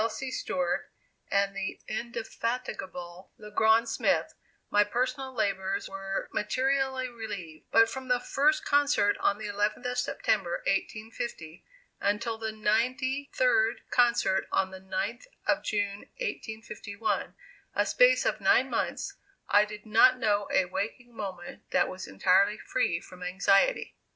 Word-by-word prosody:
C. 265 +3 -5
Stewart, 270 +1 -2 0.4
and 200 0 +1
the 195 -1 -4
indefatigable 215 -6 -5
Le 210 -1 -11
Grand 220 +2 +4
Smith, 225 - +1 0.4
my 205 0 +5
personal 255 +5 -2
labors 195 -5 -1
were 195 0 -4
materially 265 +2 0
relieved; 205 -10 -8
but 225 0 +6
from 260 +3 -6
the 250 -1 +2
first 295 +5 +2
concert 285 -8 +3
on 200 - +2
the 215 - -7
11th 210 +3 -1
of 250 0 -2
September, 250 - 0
1850, 215 - -3 0.4
until 225 +3 -1
the 220 -1 -2
ninety 255 +6 0
third - - +3
concert 235 -6 +3
on 190 0 +1
the 190 0 -9
9th 195 - -3 0.2
of - - +2
June, 205 -1 -2
1851, 220 - -4 0.4
a - - +3
space - - +4
of - - 0
nine - - +4
months, - - -2 0.3
I 205 +1 +6
did 210 0 -10
not 255 +4 +6
know 205 -4 +1
a 190 - +3
waking 220 +6 -5
moment 185 -5 -7
that - - +3
was 185 0 -7
entirely 190 - +3
free 165 -5 0
from 180 +1 -14
anxiety. 195 - +2
215 Hz, 135 wpm, -29 LUFS, 195-250 Hz, 0.4 s, but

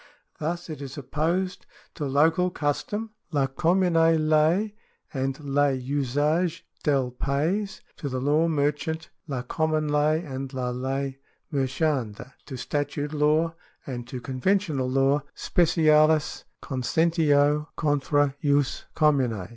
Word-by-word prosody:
Thus 170 +3 -3
it 155 -4 -7
is 140 0 -7
opposed 165 +7 -2 0.3
to 150 - -4
local 160 +6 +3
custom 205 +8 -2 0.2
(la 140 -4 +2
commune 175 +6 +1
ley 165 +4 +3 0.4
and 135 0 -2
le 145 0 +2
umge 145 +6 0 0.2
del 135 -4 +1
pays); 160 +11 -1
^ - - -50
to 145 - -4
the 130 -1 -2
law 150 +5 +2
mer 145 -3 +2
chant 160 +2 -6 0.2
[la 130 -4 -3
cojnmune 155 +2 0
ley 155 +3 +2
and 135 -2 -5
la 125 -1 -1
ley 135 +2 -3 0.3
merchaimde); 135 -4 -1
to 130 - -6
statute 145 +2 -2
law; 155 +2 +3
^ - - -19 0.3
and 120 -3 -6
to 125 - -6
conventional 140 +1 0
law 135 +2 +3
{specialis 155 -2 +3 0.2
conventio 150 +2 +2
contra 145 -1 +1
jus 145 -2 +1
commune). 125 - +2
145 Hz, 125 wpm, -26 LUFS, 135-160 Hz, 0.4 s, local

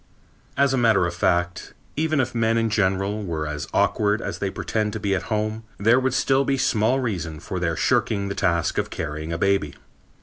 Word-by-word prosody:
As 140 0 +3
a 130 - +2
matter 110 -6 +4
of 85 - -2
fact, 85 0 -1 0.2
even 155 0 +1
if 130 -1 0
men 115 -1 +1
in 115 -1 +1
general 100 0 0
were 80 -5 -3
as 75 -1 -4
awkward 105 0 +2
as - - -5
they 100 - -1
pretend 105 +2 -2
to 110 - -3
be 100 -1 0
at 95 - 0
home, 110 0 -1 0.2
there 115 +5 +4
would 130 -1 0
still 135 0 +3
be 135 0 0
small 120 0 +2
reason 85 - -3
for - - -5
their - - 0
shirking 100 -2 +1
the 100 - -2
task 85 -4 0
of - - -2
carrying 80 +1 -5
a 85 - -2
baby. 95 -5 +1
105 Hz, 205 wpm, -23 LUFS, 85-115 Hz, 0.2 s, matter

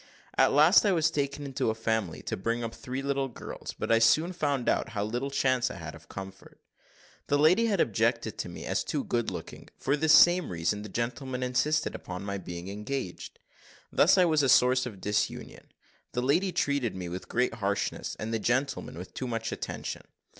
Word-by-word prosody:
At - - +4
last 155 +7 +6
I 205 -3 +3
was 160 -2 +2
taken 145 -1 -2
into 135 -4 -1
a 110 - -1
family 110 -6 -2
to - - -3
bring 115 +4 -2
up 115 0 -4
three 130 +2 -5
little 140 -1 0
girls; 120 - -8
but - - -2
I 115 - +5
soon 155 +10 +4
found 140 -7 -1
out - - +1
how 100 - +1
little 120 +6 -2
chance 130 -2 +1
I - - -7
had 80 -4 -7
of 85 0 -15
comfort. 95 0 -10 0.7
The 145 - +2
lady 180 +10 +4
had 205 -3 0
objected - - +1
to - - -3
me - - -8
as - - 0
too 280 - -2
good 120 - -1
looking - - -8
for 140 - 0
this 155 +1 +2
same 175 0 +6
reason 90 +4 -1
the 105 - -8
gentleman 125 +4 -3
insisted 150 +5 +1
upon 90 +1 -7
my 100 -1 -3
being 90 -1 -7
engaged. 105 +1 -5 0.5
"Thus - - +5
was 165 -5 +4
I 135 - +2
a - - +1
source 125 +1 +5
of 100 -6 -10
disunion 105 +2 -3 0.4
the 125 - -1
lady 170 +9 +2
treated 140 - 0
me 90 -2 -5
with 90 +2 -7
great 125 0 +1
harshness, 100 -3 -2
and 110 +1 -4
the 115 - 0
gentleman 120 - -1
with 90 +2 -9
too 130 - -4
much 115 -1 -3
attention. - - -5
125 Hz, 200 wpm, -28 LUFS, 105-145 Hz, 0.7 s, last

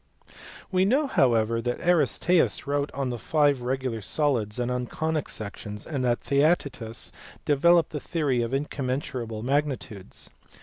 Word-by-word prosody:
We 185 -1 +3
know 265 +10 +3
however 115 - +2
that 120 +1 -2
Aristaeus 175 0 +3
wrote 145 0 -1
on 135 -2 -1
the 120 - -4
five 145 -2 +2
regular 125 -2 -2
solids 115 -3 0
and 125 0 -1
on 125 0 -2
conic 160 +2 -2
sections, 105 0 -6
and 140 -5 -2
that 120 -1 +1
Theaetetus 140 -6 0 0.3
developed 165 +3 +4
the 150 - -3
theory 145 -6 0
of 115 0 -2
incommensurable 130 -5 -3
magnitudes. 135 -7 -2
135 Hz, 135 wpm, -26 LUFS, 120-150 Hz, 0.3 s, developed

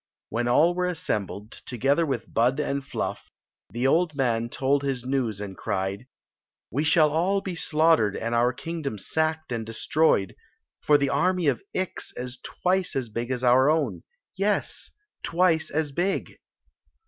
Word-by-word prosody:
When 120 +1 -1
all 155 +8 +4
were 180 0 0
assembled, 110 - -3
together 140 +6 0
with 130 -5 -4
Bud 125 +5 +2
and 140 -2 -1
Fluff; 135 - -4 0.4
(iic 120 +3 0
old 165 +3 +2
maji 120 -4 0
told 135 +3 +1
his 135 -3 -2
news 125 -6 -1
and 100 -2 -6
cried: 95 +6 -3 0.6
"We 140 +6 0
shall 155 -1 +4
all 180 +6 +2
be 190 -2 -5
slaughtored 155 - +3
and 115 +1 -2
our 120 +1 +3
kingdc»fi 155 -1 -5
sacked 155 +7 -1
and 115 -2 -2
dS^yed, 115 - +2 0.5
for 150 - +5
the 140 -1 0
army 180 +4 +1
of 135 -5 +2
Ix 185 -1 -3
is 125 0 -6
twice 185 0 -1
as 130 -4 -2
big 120 +3 -4
as 130 -1 -2
our 130 +3 +5
own 160 +1 0 0.2
— - - -55
yes, 200 +2 -1 0.3
twice 170 -2 +2
as 150 -1 -1
big 175 +7 -2
140 Hz, 160 wpm, -26 LUFS, 120-160 Hz, 0.6 s, for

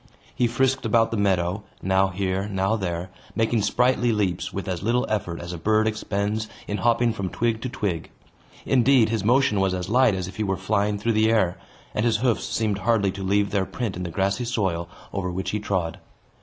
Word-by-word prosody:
He 120 - +2
frisked 130 +3 +1
about 115 0 +3
the - - -1
meadow, 95 -1 +1 0.2
now 95 +1 +3
here, 95 +1 -2
now 95 +1 0
there, 90 -3 -3 0.2
making 115 0 +1
sprightly 120 +3 +2
leaps, 95 -5 -1
with 100 +1 -5
as 90 -3 -2
little 120 +5 +1
effort 95 -6 -2
as 85 +1 -6
a 85 - -6
bird 110 +4 +2
expends 105 0 -2 0.2
in 105 - -2
hopping 120 0 +2
from 100 -4 -3
twig 115 +1 -1
to 130 - -3
twig. 95 -9 -3 0.6
Indeed, 125 -2 +4
his 110 -2 -1
motion 120 -2 +3
was 95 -1 +1
as 90 +1 -4
light 125 -2 +4
as 95 -2 -3
if 95 - -10
he 110 - 0
were 95 -2 -1
flying 100 +1 0
through 115 +3 0
the 110 +1 +3
air, 95 -6 +2 0.4
and 105 - 0
his 115 -2 +3
hoofs 120 0 +1
seemed 105 -3 -1
hardly 105 -2 +2
to 95 - -7
leave 100 +1 +1
their 100 -2 0
print 115 -6 -3
in 90 - -5
the 90 - -3
grassy 100 +6 0
soil 95 -8 -1 0.2
over 95 -2 -2
which 95 +2 -3
he 105 - -1
trod. 95 -5 -2
105 Hz, 210 wpm, -24 LUFS, 95-115 Hz, 0.6 s, Indeed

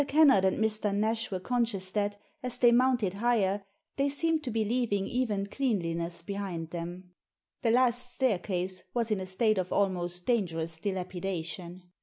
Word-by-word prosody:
Kennard 280 -9 +6
and 190 - +2
Mr. 215 -2 +1
Nash 220 +2 0
were 185 - -2
con 245 +5 +1
scious 195 -5 -4
that, 205 0 -1 0.2
as 250 -1 -2
they 240 -1 +6
mounted 240 -5 +3
higher, 205 -2 +1 0.3
they 280 +1 +2
seemed 320 +3 +1
to 260 - -3
be 220 -1 0
leaving 215 -4 0
even 215 -4 -1
cleanliness 170 -8 -2
behind 180 -4 -4
them. 175 +1 -6 0.5
The 235 - +2
last 245 +1 +3
staircase 185 -7 -1
was 230 -2 0
in 210 - +1
a 185 - -5
state 210 +2 +2
of 185 -1 -2
almost 180 -3 0
dangerous 165 -9 -1
dilapidation. 180 -2 -4
200 Hz, 160 wpm, -30 LUFS, 185-240 Hz, 0.5 s, Kennard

